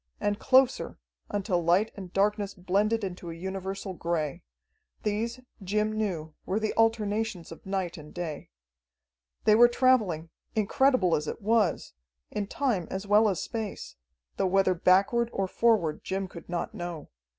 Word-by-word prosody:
And 205 Hz, +1 st, -1 dB
closer, 260 Hz, 0 st, +3 dB, 0.3 s
until 190 Hz, -4 st, 0 dB
light 180 Hz, +6 st, +3 dB
and 190 Hz, -3 st, -8 dB
darkness 205 Hz, +1 st, 0 dB
blended 205 Hz, +5 st, +1 dB
into 180 Hz, -2 st, -5 dB
a 165 Hz, -, -6 dB
universal 190 Hz, +2 st, -5 dB
gray. 165 Hz, -4 st, -2 dB, 0.6 s
These, 230 Hz, +4 st, -2 dB, 0.2 s
Jim 210 Hz, +3 st, 0 dB
knew, 180 Hz, -8 st, -2 dB
were 195 Hz, +3 st, -1 dB
the 215 Hz, -1 st, -1 dB
alternations 220 Hz, -5 st, 0 dB
of 165 Hz, -, -11 dB
night 190 Hz, -3 st, -2 dB
and 150 Hz, 0 st, -12 dB
day. 165 Hz, -4 st, -5 dB, 0.9 s
They 215 Hz, -, +5 dB
were 240 Hz, +3 st, +8 dB
traveling 220 Hz, -11 st, +2 dB, 0.2 s
incredible 220 Hz, -2 st, +3 dB
as 150 Hz, 0 st, -2 dB
it -, -, -4 dB
was 215 Hz, -4 st, +1 dB, 0.4 s
in 205 Hz, -1 st, -2 dB
time 220 Hz, -, -1 dB
as 190 Hz, +1 st, -4 dB
well 210 Hz, +2 st, +5 dB
as 190 Hz, -, -2 dB
space, 215 Hz, -, -5 dB, 0.4 s
though -, -, +2 dB
whether 190 Hz, 0 st, +3 dB
backward 195 Hz, +7 st, +3 dB
or 195 Hz, -4 st, -1 dB
forward 210 Hz, -7 st, +2 dB
Jim 190 Hz, 0 st, -2 dB
could 170 Hz, -1 st, -12 dB
not 175 Hz, -1 st, -3 dB
know. 175 Hz, -4 st, -6 dB
195 Hz, 150 wpm, -28 LUFS, 175-220 Hz, 0.9 s, were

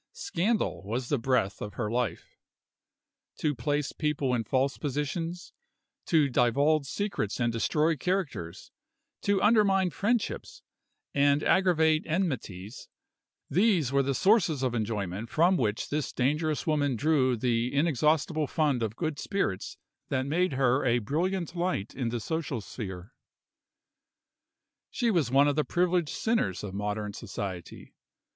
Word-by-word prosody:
Scandal 230 Hz, -, -1 dB
was 120 Hz, +5 st, -4 dB
the 145 Hz, -, +1 dB
breath 125 Hz, -6 st, 0 dB
of 105 Hz, -, -6 dB
her 120 Hz, -, -2 dB
life; 120 Hz, -2 st, -3 dB, 1.0 s
to 150 Hz, -2 st, 0 dB
place 145 Hz, +3 st, -1 dB
people 150 Hz, -4 st, -1 dB
in 120 Hz, -2 st, 0 dB
false 130 Hz, +5 st, 0 dB
positions, 165 Hz, +5 st, -3 dB, 0.5 s
to 155 Hz, -4 st, +4 dB
divulge 140 Hz, +4 st, +2 dB
secrets 195 Hz, -, -2 dB
and 120 Hz, -1 st, +1 dB
destroy 155 Hz, +7 st, +1 dB
characters, 140 Hz, -, -3 dB, 0.5 s
to 200 Hz, -1 st, +1 dB
undermine 200 Hz, -4 st, +4 dB
friendships, 225 Hz, +7 st, -2 dB, 0.5 s
and 140 Hz, +1 st, +3 dB
aggravate 160 Hz, -4 st, +3 dB
enmities 130 Hz, -, -3 dB, 0.6 s
these 185 Hz, -, +2 dB
were 140 Hz, 0 st, +3 dB
the 135 Hz, 0 st, -1 dB
sources 180 Hz, -, +3 dB
of 125 Hz, -2 st, 0 dB
enjoyment 105 Hz, -2 st, -3 dB
from 175 Hz, +4 st, +3 dB
which 110 Hz, -8 st, -1 dB
this 150 Hz, 0 st, -2 dB
dangerous 150 Hz, +4 st, 0 dB
woman 145 Hz, -4 st, +1 dB
drew 130 Hz, -2 st, +2 dB
the 120 Hz, +1 st, 0 dB
inexhaustible 150 Hz, +1 st, +1 dB
fund 145 Hz, -6 st, +1 dB
of 110 Hz, -1 st, -2 dB
good 155 Hz, -2 st, -3 dB
spirits 150 Hz, -, -2 dB, 0.3 s
that 130 Hz, -1 st, 0 dB
made 165 Hz, +3 st, +1 dB
her 130 Hz, 0 st, +2 dB
a 120 Hz, -2 st, +3 dB
brilliant 170 Hz, -, -2 dB
light 170 Hz, -, -2 dB
in 125 Hz, -4 st, -2 dB
the 120 Hz, +1 st, -2 dB
social 155 Hz, 0 st, -3 dB
sphere. 95 Hz, -1 st, -8 dB, 1.8 s
She 235 Hz, -2 st, 0 dB
was 165 Hz, -, +1 dB
one 140 Hz, +3 st, +5 dB
of 145 Hz, -, +1 dB
the 150 Hz, -, +2 dB
privileged 175 Hz, +2 st, +1 dB
sinners 220 Hz, -, -1 dB
of 100 Hz, -2 st, -6 dB
modern 105 Hz, +1 st, -3 dB
society. 95 Hz, -5 st, -7 dB
140 Hz, 135 wpm, -28 LUFS, 120-165 Hz, 1.8 s, one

